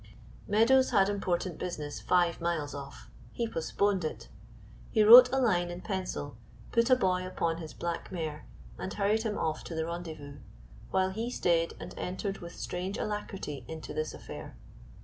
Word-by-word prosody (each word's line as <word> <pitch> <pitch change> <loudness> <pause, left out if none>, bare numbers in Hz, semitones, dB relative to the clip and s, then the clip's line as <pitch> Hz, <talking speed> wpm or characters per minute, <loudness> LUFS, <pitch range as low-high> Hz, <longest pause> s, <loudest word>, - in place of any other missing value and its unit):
Meadows 235 +6 +4
had 195 -1 +4
important 185 -3 -1
business 150 -5 -4
five 175 -2 +2
miles 165 -4 -1
off; 140 0 -9 0.2
he 235 - -2
postponed 195 +1 0
it. 155 - -5 0.6
He 215 - +3
wrote 245 +4 +11
a 265 - +1
line 180 -9 +2
in 175 +1 -6
pencil, 185 - -4 0.3
put 230 +1 +3
a 255 - +7
boy 185 -6 +1
upon 170 -3 -1
his 160 -2 -8
black 170 +1 -4
mare, 155 -4 -4 0.3
and 190 - -4
hurried 210 +2 +1
him 220 -2 -2
off 155 -1 -1
to 165 - -6
the 160 0 -1
rendezvous, 160 -4 -7 0.5
while 190 0 +1
he 225 +5 -3
stayed 170 -8 +1
and - - -8
entered 195 +2 -3
with 170 -1 -9
strange 185 +3 -4
alacrity 195 - -4
into 160 -2 -7
this 155 0 -2
affair. - - -9
180 Hz, 165 wpm, -30 LUFS, 160-205 Hz, 0.6 s, wrote